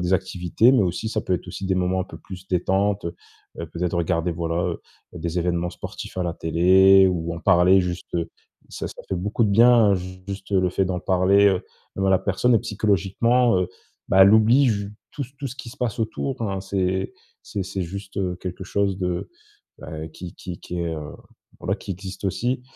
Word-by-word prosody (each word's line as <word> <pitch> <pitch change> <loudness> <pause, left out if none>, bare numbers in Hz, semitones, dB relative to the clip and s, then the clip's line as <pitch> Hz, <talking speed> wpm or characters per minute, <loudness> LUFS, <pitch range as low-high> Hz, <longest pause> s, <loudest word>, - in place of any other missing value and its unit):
des 90 +1 -1
activités, 95 +5 +2
mais 130 -5 +4
aussi 90 +4 -2
ça 110 - -1
peut 95 - -1
être 90 - -4
aussi 100 - -6
des 95 0 +1
moments 90 0 +1
un - - -2
peu - - -11
plus 95 0 -11
détentes. 95 +2 +1
Heu 85 - -4 0.5
heu, 85 - -4
peut-être 85 +2 -2
regarder, 85 0 0
voilà, 85 0 -2 0.2
heu, - - -8 0.3
des 85 +1 -3
évènements 85 0 0
sportifs - - -8
à 90 - 0
la 85 - -1
télé 95 +4 +5
ou 85 -2 -1
en - - -6
parler. 90 +3 +5
Juste 90 -1 -4 0.5
ça - - -5
ça - - -11
fait - - -1
beaucoup 100 +6 0
de 105 - +1
bien 115 -1 +6
ju 95 0 -6
juste 100 0 -7
le 95 -2 +3
fait 95 - +1
d'en 90 -1 -2
parler. 95 +2 +3
Heu, 95 -2 +2 0.3
bah 95 0 +1
la 95 - +5
personne, 115 +6 +2
heu, - - +4
psychologiquement, 105 +4 +2
heu, 90 - -1 0.4
ben 95 - +3
elle 100 +2 +7
oublie 115 +6 +5
ju 100 -3 -1 0.2
tout 150 - -4 0.2
tout 140 - -4
ce 130 - -7
qui 120 - -8
se 135 - -13
passe 120 -3 -2
autour 120 +3 -3
hein. 100 -3 -2
C'est 95 0 -1 0.3
c'est 100 - -4
c'est 95 0 -4
juste, 95 +3 -7
heu, 90 -2 -1
quelque 95 +1 -6
chose 100 0 0
de 90 -2 -3 0.5
bah 80 0 -7
qui 85 +2 -9
qui 90 -2 -8
qui 90 - -6
est, 85 -1 -2
heu, 75 -2 -6 0.5
voilà 95 +3 -1
qui 100 - -9
existe 95 +2 -7
aussi. 120 +6 -1
95 Hz, 210 wpm, -23 LUFS, 90-100 Hz, 0.5 s, elle